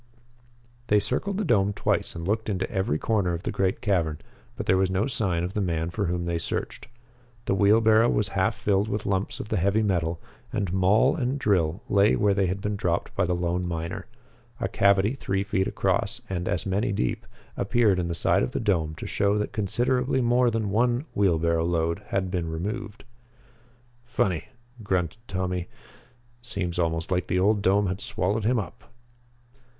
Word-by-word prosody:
They 105 - +4
circled 135 - -1
the 210 - -1
dome 100 - +2
twice - - -1
and 85 +1 -5
looked 110 +2 -1
into 95 -2 -1
every 95 +4 0
corner 100 -6 0
of 85 - -7
the - - -2
great 95 -1 0
cavern, 85 -7 0 0.4
but - - -5
there 95 - +3
was 95 0 +2
no 95 +3 +1
sign 100 -10 0
of 90 +2 -3
the 105 - -1
man 85 -2 -1
for 100 +1 -1
whom 85 0 -2
they 85 -1 -1
searched. - - -4 0.6
The - - +1
wheelbarrow 110 +3 +5
was 105 -2 +1
half 95 +2 0
filled 105 -1 +1
with 105 0 -3
lumps 95 0 -1
of 105 - -6
the - - 0
heavy 100 +4 +2
metal, 85 -4 0 0.3
and 95 -4 -2
maul 95 +3 +4
and 130 +2 -1
drill 95 - +1
lay 100 -3 +4
where 105 -1 +2
they 95 -1 +1
had 95 +2 -2
been 105 +1 -2
dropped 90 -4 -1
by 95 - +1
the 90 - +1
lone 90 +1 -1
miner. 85 -1 -4 0.5
A - - 0
cavity 100 +3 +3
three 95 -7 -2
feet 100 -2 0
across, 100 +4 0
and 90 -3 -3
as 90 - -1
many 100 +3 0
deep, 65 -11 -2 0.3
appeared 105 -2 +2
in 85 - -1
the 85 - -3
side - - +2
of 60 - -2
the - - -1
dome 80 -6 0
to - - -8
show 100 0 +1
that 105 - -2
considerably 125 +5 0
more 120 0 +3
than 110 -3 -1
one 120 +5 +1
wheelbarrow 85 -4 +2
load 85 -1 0
had 95 -2 -1
been 85 -3 -2
removed. 105 +7 -5 1.0
"Funny," 95 -9 -1 0.4
grunted 95 -2 -1
Tommy. 90 -1 -2 0.7
"Seems 100 -7 -3
almost 80 0 -1
like 90 -1 0
the 90 - 0
old 105 +2 +3
dome 100 +2 +3
had 95 +1 -3
swallowed 100 +4 -1
him 125 +2 +3
up." 110 +1 -6
95 Hz, 185 wpm, -26 LUFS, 90-105 Hz, 1.0 s, wheelbarrow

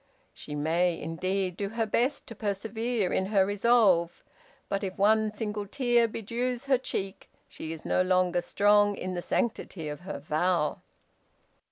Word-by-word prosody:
She 150 - -8
may, 165 +3 +1
indeed, 185 +3 -2
do 200 +1 -3
her 225 +1 -1
best 250 +6 0
to - - -9
persevere 220 0 -2
in 190 - +1
her 195 -2 +3
resolve, 200 -5 +3 0.4
but 200 +1 -2
if 190 -1 -4
one 215 +2 +3
single 210 -1 -4
tear 240 0 +2
bedews 235 +3 -3
her 265 -2 +3
cheek, 195 -6 -5 0.2
she 160 - -7
is 160 -1 -8
no - - +2
longer 185 -1 +2
strong 205 +2 +3
in 185 0 -4
the 175 - -3
sanctity 185 -6 -2
of 150 - -6
her 185 -2 -6
vow. 155 +2 0
200 Hz, 155 wpm, -28 LUFS, 180-225 Hz, 0.4 s, her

